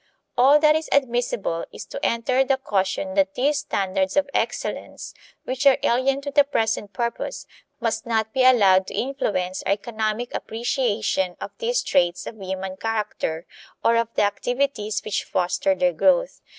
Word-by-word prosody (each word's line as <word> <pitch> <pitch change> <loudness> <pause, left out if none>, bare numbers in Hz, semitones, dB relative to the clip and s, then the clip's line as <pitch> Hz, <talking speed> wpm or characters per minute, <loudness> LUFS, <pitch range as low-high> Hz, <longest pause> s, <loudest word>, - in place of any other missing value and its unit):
All 270 +4 +6
that 305 0 +5
is 315 0 -2
admissible 240 -10 0
is - - -9
to - - -8
enter 250 +3 +2
the 270 0 +1
caution 195 -6 -1
that 195 0 +1
these 285 +3 +1
standards 190 +1 -1
of 290 - +3
excellence, - - -3 0.3
which 260 +2 0
are 270 - +6
alien 265 +3 +2
to 285 0 -5
the 285 0 +5
present 220 -7 -1
purpose, 235 - -3 0.3
must 230 0 -2
not 220 -1 0
be 260 -1 +2
allowed 195 -7 +5
to - - -6
influence 190 -8 -2
our 195 - +1
economic 220 +2 -3
appreciation 220 -5 -1
of - - -6
these 485 +1 0
traits 175 0 +1
of 220 -3 -9
human 190 0 -5
character 210 -7 -3 0.4
or 230 - +5
of 230 0 +2
the - - +3
activities 215 0 -1
which 215 - -1
foster 190 +11 0
their 270 -1 +1
growth. - - +2
230 Hz, 160 wpm, -23 LUFS, 195-270 Hz, 0.4 s, All